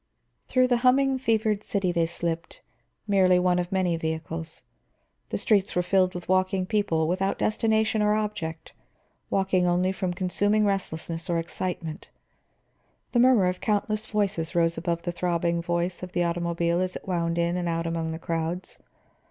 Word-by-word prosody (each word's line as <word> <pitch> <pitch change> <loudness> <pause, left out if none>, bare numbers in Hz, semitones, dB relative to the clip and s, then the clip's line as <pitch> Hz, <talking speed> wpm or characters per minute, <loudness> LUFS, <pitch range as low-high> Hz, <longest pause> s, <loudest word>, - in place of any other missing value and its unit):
Through 255 -1 +3
the 250 -1 +2
humming, 265 +2 +3
fevered 220 -4 +1
city 195 -3 0
they 170 -1 +1
slipped, 170 0 -4 0.4
merely 190 -3 +4
one 180 0 +2
of 175 0 -3
many 185 -3 +1
vehicles. 160 0 -4 0.7
The - - -2
streets 205 -4 +2
were 180 - +2
filled 185 0 +2
with 175 - -6
walking 185 0 +1
people, 185 -6 +1
without 190 +3 0
destination 220 0 +1
or 210 0 +3
object, 210 -7 -4 0.6
walking 190 -2 +2
only 180 +2 +2
from 185 -1 -2
consuming 205 +4 +1
restlessness 165 -4 -2
or 170 - +1
excitement. 165 -1 -4 1.0
The 240 - +2
murmur 245 -5 +5
of 180 0 -1
countless 215 0 -1
voices 195 -6 -1
rose 165 -1 +3
above 170 0 -2
the 175 - -2
throbbing 170 -1 0
voice 175 +1 -2
of 180 0 -7
the 175 - +1
automobile 170 0 0
as 185 0 -2
it - - -8
wound 170 -2 -1
in 170 +1 +1
and 175 -1 -1
out 165 0 -1
among 165 -1 -2
the 160 - -4
crowds. 165 +2 -4
180 Hz, 160 wpm, -26 LUFS, 170-200 Hz, 1.0 s, murmur